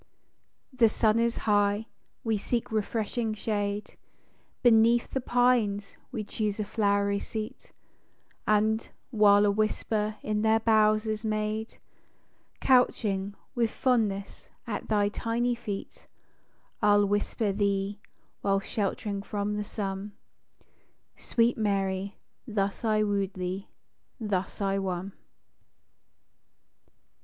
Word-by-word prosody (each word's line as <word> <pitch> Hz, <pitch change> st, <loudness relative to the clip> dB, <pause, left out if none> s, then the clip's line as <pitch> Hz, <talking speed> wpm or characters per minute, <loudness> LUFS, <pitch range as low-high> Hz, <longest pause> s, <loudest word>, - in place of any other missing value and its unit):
The 240 Hz, -3 st, +5 dB
sun 215 Hz, +1 st, +2 dB
is 235 Hz, 0 st, +1 dB
high 205 Hz, 0 st, +2 dB
â -, -, -40 dB, 0.3 s
we 225 Hz, -1 st, +1 dB
seek 235 Hz, +3 st, -2 dB
refreshing 220 Hz, +1 st, -1 dB
shade, 205 Hz, -1 st, -3 dB, 0.7 s
Beneath 235 Hz, 0 st, +5 dB
the 265 Hz, -, -1 dB
pines 240 Hz, -5 st, +2 dB, 0.2 s
we 225 Hz, -5 st, -3 dB
choose 210 Hz, 0 st, -2 dB
a -, -, +1 dB
flowery 200 Hz, -1 st, +1 dB
seat; 215 Hz, 0 st, -6 dB, 0.8 s
And, 215 Hz, +1 st, +2 dB, 0.2 s
while 210 Hz, -3 st, +6 dB
a 205 Hz, -, +4 dB
whisper 215 Hz, 0 st, 0 dB
in 210 Hz, 0 st, 0 dB
their 220 Hz, 0 st, +4 dB
boughs 215 Hz, -1 st, +3 dB
is 215 Hz, 0 st, -2 dB
made, 215 Hz, 0 st, -2 dB, 0.8 s
Couching, 205 Hz, -6 st, +2 dB, 0.2 s
with 235 Hz, -4 st, +1 dB
fondness, 215 Hz, -6 st, -1 dB, 0.2 s
at 230 Hz, -, -4 dB
thy 205 Hz, -2 st, +3 dB
tiny 235 Hz, +3 st, 0 dB
feet, 210 Hz, -4 st, -6 dB, 0.7 s
I'll 205 Hz, 0 st, +5 dB
whisper 205 Hz, +1 st, 0 dB
thee, 200 Hz, 0 st, 0 dB, 0.4 s
while 195 Hz, 0 st, +2 dB
sheltering 200 Hz, 0 st, -2 dB
from 205 Hz, 0 st, -2 dB
the 210 Hz, -, -1 dB
sunâ 200 Hz, -1 st, -4 dB, 0.5 s
" -, -, -41 dB
Sweet 235 Hz, 0 st, +1 dB
Jlary, 195 Hz, -2 st, 0 dB, 0.3 s
thus 200 Hz, -2 st, -1 dB
I 215 Hz, -1 st, +2 dB
woo'd 200 Hz, -2 st, -1 dB
thee, 185 Hz, +2 st, -4 dB, 0.5 s
thus 205 Hz, -3 st, -2 dB
I 195 Hz, 0 st, +1 dB
won." 190 Hz, 0 st, -3 dB
210 Hz, 110 wpm, -28 LUFS, 200-225 Hz, 0.8 s, while